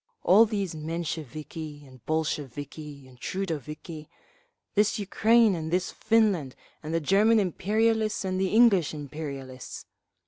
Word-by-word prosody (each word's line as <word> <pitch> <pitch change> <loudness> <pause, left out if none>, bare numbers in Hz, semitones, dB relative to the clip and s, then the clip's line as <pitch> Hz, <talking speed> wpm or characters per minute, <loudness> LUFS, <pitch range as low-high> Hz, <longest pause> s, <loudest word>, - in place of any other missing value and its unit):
All 215 +5 +6
these 200 -5 -2
Mensheviki 155 -1 -5
and 130 -3 -17
Bolsheviki 145 -2 -4
and 125 -1 -18
Trudoviki…. 155 -3 -5 0.7
This 210 0 +2
Ukraine 220 +2 +3
and 160 -2 -3
this 180 +2 0
Finland 210 - +1 0.3
and 155 - -6
the 165 - +1
German 210 +7 +4
imperialists 215 +3 +1
and 185 0 -1
the 190 - +2
English 200 -7 +4
imperialists. 140 -3 -7
165 Hz, 115 wpm, -27 LUFS, 150-205 Hz, 0.7 s, All